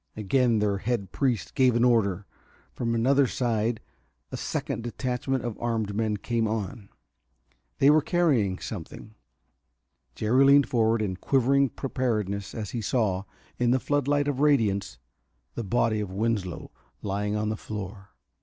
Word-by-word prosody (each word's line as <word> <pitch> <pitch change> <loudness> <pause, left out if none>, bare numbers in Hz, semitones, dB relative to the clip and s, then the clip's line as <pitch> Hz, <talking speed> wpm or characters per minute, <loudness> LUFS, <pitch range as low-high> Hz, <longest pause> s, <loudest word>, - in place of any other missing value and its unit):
Again 115 +3 +2
their 105 -2 0
head 100 -3 -2
priest 125 - -1
gave 130 -2 +3
an 120 - +3
order; 105 -6 +2 0.5
from 115 -1 -1
another 135 +4 +3
side 115 -2 -1 0.5
a - - -4
second - - -3
detachment 125 +2 -2
of 120 -3 -5
armed 110 -3 -1
men 110 0 0
came 115 +1 -1
on. 105 -1 -4 0.9
They 140 - +6
were 155 +1 +5
carrying 140 - +1
something. 105 +2 -8 1.0
Jerry 120 +5 +3
leaned 140 0 +6
forward 115 -2 +2
in 95 -3 -3
quivering 135 +5 +2
preparedness 105 -8 -2
as 110 -4 -5
he 120 - -3
saw, 100 -4 0 0.3
in 120 -1 +2
the 130 +2 +3
floodlight 145 +1 +1
of 140 -2 -1
radiance, 105 - +2 0.6
the 120 - -4
body 110 +1 +1
of 105 -2 -3
Winslow 100 -2 -2 0.3
lying 105 +1 -1
on 105 0 -1
the 110 - -1
floor. 100 -2 -7
115 Hz, 145 wpm, -26 LUFS, 105-125 Hz, 1.0 s, They